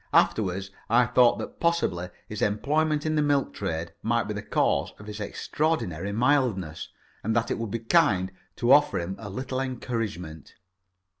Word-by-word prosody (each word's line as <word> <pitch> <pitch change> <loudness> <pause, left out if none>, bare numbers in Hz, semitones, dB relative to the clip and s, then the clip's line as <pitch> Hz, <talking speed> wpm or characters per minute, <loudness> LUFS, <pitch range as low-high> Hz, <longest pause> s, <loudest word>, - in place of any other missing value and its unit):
Afterwards 95 -2 +2 0.2
I 120 +2 +5
thought 120 +1 +4
that - - -7
possibly 170 - 0 0.2
his 105 - -6
employment 150 +8 +1
in 155 - +1
the 150 - +3
milk 145 -2 +1
trade 85 -4 -3
might 115 +1 +1
be 105 - -4
the 105 - -4
cause - - +1
of 105 - -12
his 105 0 -7
extraordinary 100 - -1
mildness, 115 - +1 0.3
and 110 +2 0
that 115 -1 +1
it - - -1
would 115 -1 -3
be 115 - -2
kind 105 - +3 0.2
to 120 +1 +1
offer 145 +1 +6
him 85 +3 -4
a 110 -3 -7
little 130 +5 -3
encouragement. 115 - -4
115 Hz, 165 wpm, -27 LUFS, 95-135 Hz, 0.3 s, offer